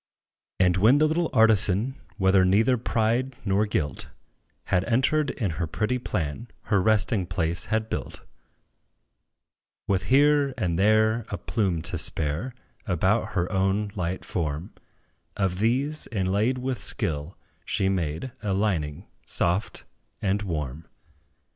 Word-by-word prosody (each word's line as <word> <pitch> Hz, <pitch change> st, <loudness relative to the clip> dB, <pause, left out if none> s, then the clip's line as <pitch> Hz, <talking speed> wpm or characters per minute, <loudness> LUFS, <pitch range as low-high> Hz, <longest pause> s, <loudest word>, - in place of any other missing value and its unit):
And 90 Hz, -1 st, +4 dB
when 110 Hz, +9 st, +5 dB
the 155 Hz, -, +4 dB
little 165 Hz, +1 st, 0 dB
artisan, 110 Hz, +1 st, +3 dB, 0.2 s
While 95 Hz, -1 st, +4 dB
neither 110 Hz, +7 st, +4 dB
pride 120 Hz, +2 st, 0 dB
nor 100 Hz, +2 st, +2 dB
guilt 75 Hz, -7 st, -2 dB, 0.5 s
Had 90 Hz, 0 st, +1 dB
entered 140 Hz, +5 st, +2 dB
in 110 Hz, -10 st, -2 dB
her 85 Hz, -, 0 dB
pretty 110 Hz, +10 st, -1 dB
plan, 90 Hz, +1 st, -3 dB, 0.2 s
Her 100 Hz, -3 st, +2 dB
resting 105 Hz, -2 st, +2 dB
place 85 Hz, -2 st, -1 dB
had 110 Hz, +1 st, -1 dB
built; -, -, -5 dB, 1.6 s
With 95 Hz, -2 st, 0 dB
here 140 Hz, 0 st, +4 dB
and 90 Hz, -6 st, -1 dB
there 110 Hz, +2 st, +3 dB
a 100 Hz, -, -3 dB
plume 95 Hz, -8 st, -1 dB
to 90 Hz, 0 st, -4 dB
spare, 80 Hz, -, -2 dB, 0.3 s
About 95 Hz, +4 st, +1 dB
her 90 Hz, -2 st, 0 dB
own 95 Hz, +2 st, 0 dB
light 90 Hz, -2 st, -3 dB
form, 80 Hz, +3 st, -3 dB, 0.6 s
Of 95 Hz, -2 st, 0 dB
these, 135 Hz, +8 st, 0 dB
inlaid 105 Hz, +5 st, +1 dB
with 125 Hz, -1 st, -3 dB
skill, 75 Hz, +2 st, -2 dB, 0.3 s
she 95 Hz, -, 0 dB
made 90 Hz, -, -2 dB
A 100 Hz, -3 st, -1 dB
lining 90 Hz, -5 st, -1 dB, 0.2 s
soft 90 Hz, +5 st, -1 dB, 0.3 s
and 100 Hz, 0 st, 0 dB
warm. 75 Hz, -5 st, -4 dB
100 Hz, 130 wpm, -26 LUFS, 90-115 Hz, 1.6 s, when